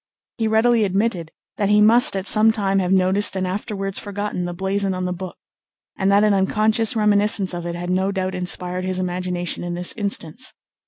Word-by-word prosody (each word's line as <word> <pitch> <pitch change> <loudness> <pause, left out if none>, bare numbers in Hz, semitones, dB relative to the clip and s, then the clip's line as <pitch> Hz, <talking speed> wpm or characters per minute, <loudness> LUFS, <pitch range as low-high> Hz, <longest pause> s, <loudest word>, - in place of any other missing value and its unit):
He 225 - 0
readily 225 +1 +3
admitted 195 -4 -1 0.3
that 205 -2 0
he 210 0 +4
must 225 +2 +6
at 190 0 -3
some 215 +1 +5
time 195 -3 0
have 180 -1 -1
noticed 190 +2 +1
and 190 -1 -1
afterwards 195 +1 -4
forgotten 205 -3 -4
the 175 - -5
blazon 195 +1 -1
on 185 0 -3
the 180 - -2
book, 180 0 -8 0.6
and 195 0 0
that 200 +1 +4
an 210 -1 +3
unconscious 215 +3 +1
reminiscence 210 -2 +2
of 175 0 -5
it 170 - -4
had 175 +1 -4
no 190 +2 0
doubt 190 -1 -3
inspired 180 0 -1
his 185 0 -3
imagination 180 -1 -3
in 175 0 -4
this 180 +1 -1
instance. 205 +2 -3
195 Hz, 195 wpm, -21 LUFS, 180-210 Hz, 0.6 s, must